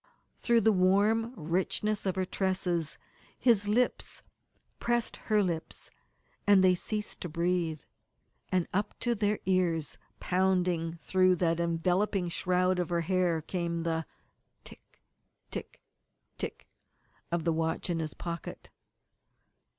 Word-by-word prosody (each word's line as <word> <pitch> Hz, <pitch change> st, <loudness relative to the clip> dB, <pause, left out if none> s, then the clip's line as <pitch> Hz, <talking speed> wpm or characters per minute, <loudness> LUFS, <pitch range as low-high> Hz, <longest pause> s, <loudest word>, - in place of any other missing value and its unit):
Through 235 Hz, -1 st, +3 dB
the 220 Hz, -, +5 dB
warm 205 Hz, +5 st, +3 dB
richness 190 Hz, +5 st, -1 dB
of 185 Hz, -, 0 dB
her 190 Hz, -1 st, 0 dB
tresses 180 Hz, -4 st, -1 dB, 0.4 s
his 220 Hz, -5 st, +3 dB
lips 240 Hz, +4 st, 0 dB, 0.6 s
pressed 240 Hz, -1 st, 0 dB
her 215 Hz, -2 st, +1 dB
lips, 170 Hz, -3 st, -4 dB, 0.6 s
and 200 Hz, -2 st, +6 dB
they 185 Hz, -1 st, +6 dB
ceased 210 Hz, +4 st, -4 dB
to 175 Hz, -, -4 dB
breathe. 170 Hz, -2 st, 0 dB, 0.7 s
And 185 Hz, -2 st, +1 dB
up 205 Hz, +2 st, -1 dB
to 240 Hz, -, +2 dB
their 210 Hz, -1 st, +1 dB
ears, 175 Hz, -5 st, 0 dB, 0.2 s
pounding 180 Hz, -3 st, +1 dB
through 185 Hz, +2 st, +3 dB
that 165 Hz, -1 st, +1 dB
enveloping 175 Hz, +3 st, +1 dB
shroud 180 Hz, +1 st, +1 dB
of 175 Hz, -, -1 dB
her 170 Hz, -1 st, +1 dB
hair 175 Hz, -2 st, +1 dB
came 170 Hz, -1 st, -2 dB
the 165 Hz, -1 st, -1 dB, 0.6 s
tick -, -, -16 dB, 0.5 s
tick -, -, -7 dB, 0.6 s
tick -, -, -5 dB, 0.7 s
of 170 Hz, -1 st, 0 dB
the 165 Hz, 0 st, +2 dB
watch 160 Hz, 0 st, -1 dB
in 170 Hz, -2 st, -1 dB
his 155 Hz, -2 st, -4 dB
pocket. 170 Hz, -1 st, -6 dB
180 Hz, 125 wpm, -30 LUFS, 170-200 Hz, 0.7 s, and